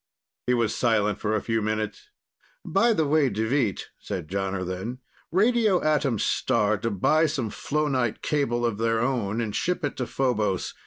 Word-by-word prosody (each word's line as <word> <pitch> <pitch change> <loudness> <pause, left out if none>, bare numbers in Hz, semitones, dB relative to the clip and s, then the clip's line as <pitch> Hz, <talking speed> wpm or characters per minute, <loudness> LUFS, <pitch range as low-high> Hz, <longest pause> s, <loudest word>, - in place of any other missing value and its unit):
He 125 - +3
was 115 -2 +1
silent 105 -4 +1
for 110 0 0
a 105 - -1
few 115 -1 0
minutes. 110 - -3 0.6
"By 235 0 +3
the 160 -8 +2
way, 145 -1 +3
Deveet," 110 0 -1
said 75 - -5
Jonner 95 -1 -2
then, 95 +8 -4 0.3
"radio 215 0 +3
Atom 150 -6 +2
Star 110 -2 +1
to 115 +2 -1
buy 155 - +3
some 130 -8 -2
flonite 140 -6 -1
cable 120 -5 0
of 110 -3 -1
their 115 0 +1
own 115 -4 0
and 110 -3 -2
ship 180 -3 0
it 145 - -3
to 125 - -2
Phobos. 110 -8 0
120 Hz, 165 wpm, -26 LUFS, 105-145 Hz, 0.6 s, He